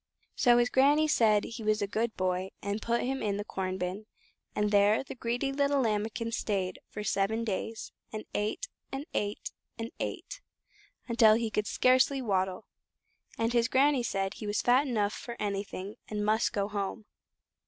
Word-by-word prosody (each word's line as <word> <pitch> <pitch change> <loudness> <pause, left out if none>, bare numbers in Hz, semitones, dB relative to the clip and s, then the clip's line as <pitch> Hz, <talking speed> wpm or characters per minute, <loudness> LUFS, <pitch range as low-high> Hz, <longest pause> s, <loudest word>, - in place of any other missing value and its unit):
So 240 -2 +5
his 240 0 +2
Granny 290 +4 +4
said 215 -8 +4
he 230 0 -7
was 215 0 +2
a - - 0
good 220 +2 -2
boy, 185 0 0
and 200 +2 -2
put 235 0 0
him 265 +2 -2
into 200 -2 0
the 205 - -3
corn 185 -2 -3
bin, 190 +4 -4 0.5
and 210 0 +1
there 205 +3 +4
the - - -8
greedy 245 +2 -2
little 280 0 +2
Lambikin 225 0 -1
stayed 190 -5 -2
for 210 - -6
seven 210 +3 0
days, 220 +1 -4 0.2
and 215 0 -6
ate, 215 - -1 0.2
and 275 +2 -4
ate, 205 0 -2 0.3
and 230 0 -5
ate, - - -5 0.7
until 230 -2 +6
he 225 -1 -1
could 210 0 -1
scarcely 255 +2 +3
waddle, 190 -4 -1 0.7
and 230 +1 0
his 235 -1 +3
Granny 270 +1 +3
said 195 -4 -1
he 210 - -7
was 205 0 0
fat 255 +4 +4
enough 210 -5 0
for 235 -1 -7
anything, 200 0 -4
and 210 -1 -2
must 220 +2 +2
go 200 -1 -1
home. 205 +1 -4
215 Hz, 175 wpm, -30 LUFS, 205-240 Hz, 0.7 s, until